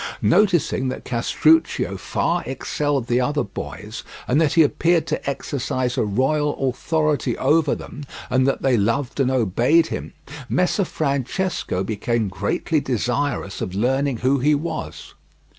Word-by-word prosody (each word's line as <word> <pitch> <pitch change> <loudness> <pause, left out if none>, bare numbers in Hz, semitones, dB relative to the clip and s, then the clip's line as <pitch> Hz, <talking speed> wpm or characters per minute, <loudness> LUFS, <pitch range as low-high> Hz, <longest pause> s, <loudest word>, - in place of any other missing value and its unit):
Noticing 170 - +3
that 130 - -5
Castruccio 155 +7 +2
far - - -1
excelled 140 0 -1
the 120 +1 +1
other 145 +3 0
boys, 100 - -7 0.3
and 140 +6 +3
that 155 -3 +2
he 165 - +6
appeared 165 +3 +2
to - - -2
exercise 130 -2 -2
a - - +1
royal 135 +8 0
authority 150 -2 0
over 150 +2 +2
them, 145 - -9 0.2
and 130 +1 +2
that 135 - 0
they 130 -3 +3
loved 120 +7 0
and 130 -2 +3
obeyed 130 - +3
him, - - -5 0.4
Messer 180 +2 +1
Francesco 140 - -2
became 110 +1 -1
greatly 100 - -1
desirous 125 -3 -2
of 90 - -4
learning 135 +4 +1
who 130 +4 +1
he 150 +4 +3
was. 145 - -5
135 Hz, 140 wpm, -22 LUFS, 120-150 Hz, 0.4 s, he